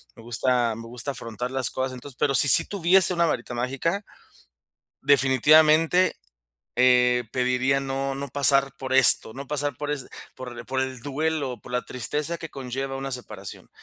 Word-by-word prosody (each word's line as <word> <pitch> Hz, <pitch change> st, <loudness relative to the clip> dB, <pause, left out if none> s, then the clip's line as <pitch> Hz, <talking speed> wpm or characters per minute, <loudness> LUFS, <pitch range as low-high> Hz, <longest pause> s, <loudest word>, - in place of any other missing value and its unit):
Me -, -, -14 dB
gusta 120 Hz, 0 st, 0 dB
me 115 Hz, +1 st, -9 dB
gusta 125 Hz, +4 st, -5 dB
afrontar 125 Hz, 0 st, -6 dB
las 130 Hz, -1 st, -2 dB
cosas. 130 Hz, 0 st, -3 dB
Entonces, 125 Hz, +1 st, -11 dB
pero 135 Hz, -1 st, +1 dB
si 140 Hz, -, +4 dB
sí 110 Hz, -6 st, +7 dB
tuviese 185 Hz, -1 st, +3 dB
una 170 Hz, 0 st, +2 dB
varita 125 Hz, -6 st, -3 dB
mágica, 135 Hz, -, -2 dB, 1.0 s
definitivamente, 155 Hz, +6 st, +4 dB, 0.6 s
eh, 125 Hz, -1 st, +4 dB
pediría 130 Hz, +2 st, +1 dB
no, 135 Hz, 0 st, -3 dB
no 140 Hz, +1 st, -5 dB
pasar 140 Hz, 0 st, +2 dB
por 130 Hz, -1 st, -5 dB
esto, 130 Hz, -3 st, +4 dB
no 135 Hz, +1 st, -8 dB
pasar 145 Hz, -2 st, -2 dB
por 145 Hz, +2 st, -4 dB
es 140 Hz, -3 st, -3 dB, 0.3 s
por 120 Hz, -2 st, -8 dB
por 130 Hz, 0 st, -2 dB
el 130 Hz, -2 st, -4 dB
duelo, 145 Hz, -1 st, -3 dB
por 125 Hz, -, -12 dB
la 125 Hz, -, 0 dB
tristeza 150 Hz, +7 st, -3 dB
que 165 Hz, -, -7 dB
conlleva 135 Hz, 0 st, -5 dB
una 135 Hz, 0 st, -5 dB
separación. 105 Hz, -7 st, -8 dB
135 Hz, 165 wpm, -24 LUFS, 125-145 Hz, 1.0 s, sí